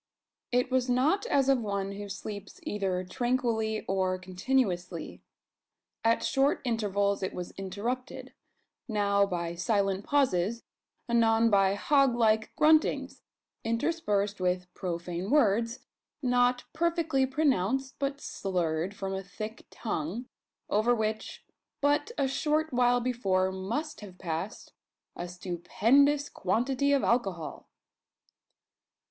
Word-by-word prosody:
It 250 +1 +1
was 255 -1 +1
not 300 - +2
as 275 - +2
of 270 -2 +4
one 200 -2 -2
who 205 0 -7
sleeps 200 0 -7
either 190 -3 -1
tranquilly, 225 +1 -1
or 185 -1 +1
continuously. 185 -2 -2 0.8
At 230 0 +3
short 270 +1 +2
intervals 205 -4 0
it 190 - -3
was 180 -1 -5
interrupted 225 +7 -5 0.5
now 200 -3 +2
by 170 -2 -3
silent 195 +1 0
pauses 230 -6 +1 0.4
anon 230 -1 +3
by 195 -1 +4
hog 275 +2 +3
like 220 -2 +2
gruntings, 310 0 +3 0.4
interspersed 225 - 0
with 180 0 -1
profane 175 +1 -4
words, 230 -3 +2 0.4
not 245 0 +3
perfectly 325 -5 +1
pronounced, 265 -2 0
but 280 0 -2
slurred 180 - -2
from 195 -1 -4
a 190 - -2
thick 215 +3 -8
tongue, 210 +2 -4 0.4
over 220 +4 +3
which, 220 -1 -3 0.3
but 290 +3 +2
a 275 - +2
short 300 +3 0
while 245 0 +3
before, 195 -7 +1
must 220 +13 -4
have 190 -3 -11
passed 170 +4 -5 0.4
a 175 - -5
stupendous 225 - +2
quantity 255 +8 0
of 280 -1 +3
alcohol. 195 -9 -1
220 Hz, 115 wpm, -29 LUFS, 190-260 Hz, 0.8 s, of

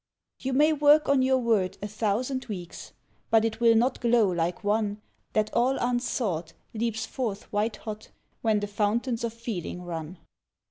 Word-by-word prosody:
You 265 0 -3
may 300 +4 +4
work 295 +1 +5
on 280 -1 +4
your 260 0 +3
word 225 -7 +1
a 205 - -4
thousand 225 +5 -1
weeks, 180 -6 -8 0.4
But 225 -1 +4
it 225 0 -2
will 230 -1 +5
not 245 +3 +2
glow 235 -3 +4
like 175 +3 -1
one 205 0 0 0.3
That 215 0 0
all 255 +3 +2
unsought, 235 -9 -1 0.2
leaps 225 0 -2
forth 220 -6 -3
white 210 +1 0
hot, 215 0 -8 0.3
When 215 -2 +2
the - - -1
fountains 225 +4 0
of 235 - -1
feeling 220 -6 -5
run. 165 0 -6
225 Hz, 165 wpm, -27 LUFS, 205-245 Hz, 0.4 s, work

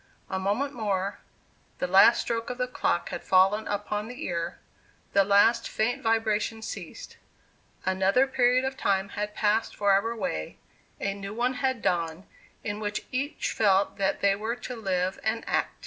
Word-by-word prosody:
A 190 - -1
moment 215 +9 -1
more 200 -4 -2 0.6
the - - -1
last 195 +6 +6
stroke 230 -1 -3
of 250 - -4
the 250 - 0
clock 210 -7 -1
had - - -5
fallen 195 +3 +3
upon 205 +1 -2
the 250 +6 -7
ear 170 -1 -3 0.6
the 200 - +5
last 205 +4 +4
faint 245 +5 -1
vibration 225 -1 0
ceased; - - -8 0.7
another 190 +7 +3
period 255 -1 +2
of 265 0 -2
time 195 -3 0
had 210 +1 -4
passed 220 +1 +1
forever 200 +2 +3
away 195 - -4 0.4
a 195 - -1
new 200 +1 -7
one 245 +2 +1
had 260 -2 -1
dawned, 170 0 0 0.4
in 205 -1 -3
which 210 -1 -3
each 275 +4 -2
felt 200 -2 +2
that 195 -1 0
they 200 0 +4
were 220 +3 -3
to 250 0 -7
live 190 -4 -1
and 225 +1 -1
act. - - +1
210 Hz, 165 wpm, -27 LUFS, 195-235 Hz, 0.7 s, last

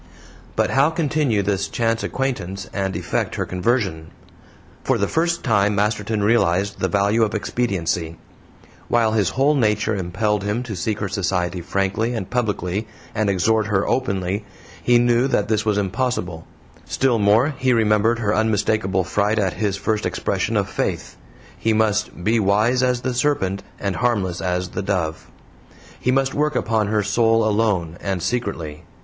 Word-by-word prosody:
But - - +1
how 135 +3 +4
continue 150 -9 0
this 100 0 0
chance 115 -1 0
acquaintance 95 -8 -3
and 95 -1 -2
effect - - -2
her - - -1
conversion? 90 -4 -1 0.8
For - - +1
the - - 0
first 170 +1 0
time 105 -3 +2
Masterton 105 +1 0
realized 100 -3 +2
the 95 - +1
value 100 +5 +2
of 110 -1 +1
expediency; 90 -8 -1 0.7
while 115 -2 +2
his 105 -5 +2
whole 140 +3 +4
nature 110 -4 +1
impelled 100 +3 -1
him 105 +4 -1
to 115 -4 -6
seek 105 +4 -2
her 100 - 0
society 90 -2 -1
frankly 100 +7 -1
and 100 -5 -3
publicly 105 -4 -1 0.3
and 110 -2 0
exhort 105 +3 +2
her 100 -2 +1
openly, 100 -5 -1 0.4
he 120 0 +4
knew 120 +1 +3
that 105 -6 0
this 110 -1 +1
was 105 -1 +2
impossible; 95 -5 -2 0.4
still 130 -4 +1
more, 110 +8 +3
he 130 0 +2
remembered 110 0 +3
her 105 -2 0
unmistakable 105 -3 +1
fright 100 +3 0
at 95 -4 +1
his 100 -2 -1
first 110 +1 -1
expression - - -1
of - - +1
faith; - - -3 0.4
he 110 - 0
must 105 -5 0
"be 115 +4 +2
wise 110 +5 +2
as 125 -1 +1
the 130 0 -2
serpent 120 -8 0 0.2
and 100 -3 -2
harmless 100 -8 0
as 90 0 -1
the 100 - -4
dove." 90 -5 -2 0.7
He - - -1
must 135 +1 +2
work 150 -1 0
upon 110 -4 +1
her 105 0 +1
soul 115 +2 +2
alone, 100 -6 0
and 95 -3 -2
secretly. 90 -9 -3
105 Hz, 160 wpm, -21 LUFS, 95-120 Hz, 0.8 s, how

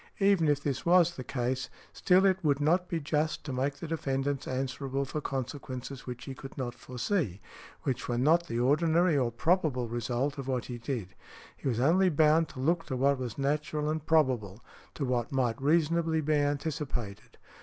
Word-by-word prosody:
Even 195 -5 +4
if 145 -1 +1
this 140 -3 -2
was 175 0 +4
the 130 - -6
case, 125 +1 -2 0.2
still 185 +1 +4
it 190 -1 +2
would 145 -2 +2
not 175 +5 +2
be 170 - -1
just 155 +1 -1
to 140 - -5
make 135 +2 -1
the 160 - -7
defendant 140 -3 -2
answerable 135 +1 -2
for 150 +3 -4
consequences 130 -1 -5
which 125 -1 -6
he 135 - -5
could 135 +1 -10
not 125 -3 -3
foresee, 125 - -2 0.4
which 130 -2 -2
were 120 - 0
not 165 +7 +3
the 115 - -2
ordinary 160 +6 +3
or 125 -4 +1
probable 145 -2 +1
result 120 +5 -2
of 135 - -5
what 130 -3 -1
he 120 -1 -6
did. 115 -5 -4 0.5
He - - -6
was 120 -3 0
only 180 +8 +4
bound 155 +1 +3
to - - -10
look 165 +5 +1
to 130 - -2
what 140 +1 +2
was 125 -4 -5
natural 150 +2 -1
and 155 -1 -3
probable, 125 -10 +1 0.3
to 140 - -2
what 125 -2 -1
might 125 -3 0
reasonably 160 +2 +2
be 155 +1 0
anticipated. 145 -7 -2
140 Hz, 185 wpm, -30 LUFS, 125-160 Hz, 0.5 s, Even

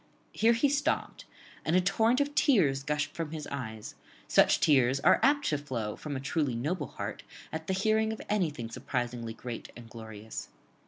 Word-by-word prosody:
Here 230 +2 +4
he 235 +5 +3
stopt, 290 +3 -1 0.4
and 160 - +1
a - - +6
torrent 220 +7 +2
of 285 0 0
tears 175 - +3
gushed 150 +1 -2
from 165 -2 -4
his 155 -1 -6
eyes; 110 -6 -5 0.3
such - - +5
tears 135 -3 +4
are - - +5
apt 285 +4 +3
to 150 - 0
flow 120 -7 -4
from 150 -2 -6
a - - -2
truly 140 -2 -1
noble 145 +5 -2
heart - - -6 0.3
at 160 0 -5
the 190 - 0
hearing 220 +3 +2
of 220 - -5
anything 155 - -1
surprisingly 120 -3 -3
great 120 0 -7
and 120 -1 -11
glorious. 110 -1 -8
150 Hz, 175 wpm, -30 LUFS, -, 0.4 s, a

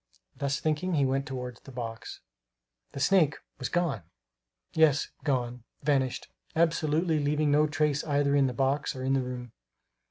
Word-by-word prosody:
Thus 140 0 -1
thinking, 160 +3 0
he 140 -2 +3
went 135 +2 0
toward 125 -3 -5
the - - -13
box. 115 -3 -6 0.7
The - - -5
snake 155 -1 +4 0.2
was 130 - -3
gone! 170 - 0 0.7
Yes, 155 -3 +4
gone, 125 -4 -1 0.2
vanished 135 -3 +1 0.3
absolutely, 160 0 +2
leaving 150 +1 +1
no 150 +1 +4
trace 150 -1 +1
either 145 -1 +2
in 140 -1 +4
the 125 - -2
box 135 +4 0
or 130 - -5
in 135 +1 +1
the 135 - +2
room. 125 -2 -6
140 Hz, 155 wpm, -29 LUFS, 130-150 Hz, 0.7 s, snake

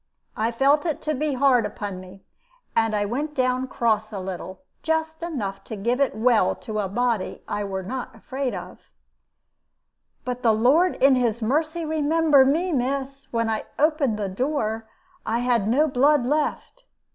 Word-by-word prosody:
I 225 +2 0
felt 275 +5 +3
it 315 - -1
to 305 - 0
be 300 +1 -1
hard 255 -3 +4
upon 205 -2 -5
me, 185 +1 -13 0.5
and 225 -1 +2
I 205 0 +1
went 290 +8 -3
down 255 0 +1
cross 220 -4 0
a 200 - -5
little 185 +4 -7 0.2
just 320 0 -1
enough 225 - -4
to 220 - -6
give 235 +6 -1
it 275 - +1
well 230 +1 +3
to 215 -1 -5
a 195 -2 -1
body 235 -1 -1
I 205 0 -2
were 190 -1 -4
not 245 +4 -5
afraid 260 +3 -4
of. - - -8 1.5
"But 250 0 -3
the 230 -3 +4
Lord 280 +12 +3
in 270 +1 +5
His 235 -3 0
mercy 315 +7 0
remember 310 -2 +4
me, 325 +7 +1
miss! 275 +1 -2
When 230 -1 0
I 220 -1 -2
opened 295 -7 +2
the 205 -2 -2
door, 220 0 -2 0.3
I 225 - -1
had 240 -4 +1
no 280 +8 +3
blood 280 0 +3
left. 305 - -2
250 Hz, 170 wpm, -24 LUFS, 220-290 Hz, 1.5 s, in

